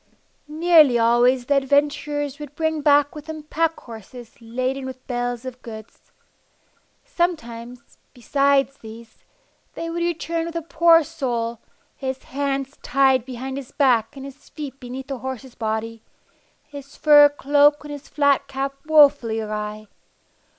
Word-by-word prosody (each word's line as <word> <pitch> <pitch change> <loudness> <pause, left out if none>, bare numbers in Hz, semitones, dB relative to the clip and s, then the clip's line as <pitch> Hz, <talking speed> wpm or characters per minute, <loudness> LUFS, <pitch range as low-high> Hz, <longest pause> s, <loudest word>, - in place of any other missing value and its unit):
Nearly 310 -4 +5
always 240 +2 +3
the 280 +2 +2
adventurers 285 +1 0
would 295 -1 -9
bring 315 -1 -1
back 290 -1 +3
with 300 0 -10
them 315 -1 -7
pack 325 +2 -1
horses 230 +1 -11
laden 255 +4 -3
with 260 -1 -8
bales 245 0 -3
of 255 -1 -8
goods. 220 -1 -12 0.9
Sometimes, 250 - -4
besides 275 +3 +1
these, 225 0 -13 0.5
they 330 0 -5
would 340 +1 -3
return 335 -1 -2
with 335 - -8
a 335 - -3
poor 330 0 +4
soul, 235 -6 -3 0.4
his 265 -1 -5
hands 275 0 -3
tied 265 -2 +2
behind 260 +1 -6
his 275 -3 -8
back 245 -4 +2
and 270 - -8
his 275 +1 -13
feet 280 -3 -8
beneath 255 +1 -7
the 270 -2 -6
horse's 260 0 -7
body, 220 0 -4 0.6
his 285 -1 -12
fur 290 -1 +7
cloak 290 +1 +3
and 295 - -9
his 290 -1 -9
flat 285 -1 +2
cap 275 0 -3
wofully 285 -7 +4
awry. 215 0 -5
275 Hz, 140 wpm, -22 LUFS, 245-295 Hz, 0.9 s, fur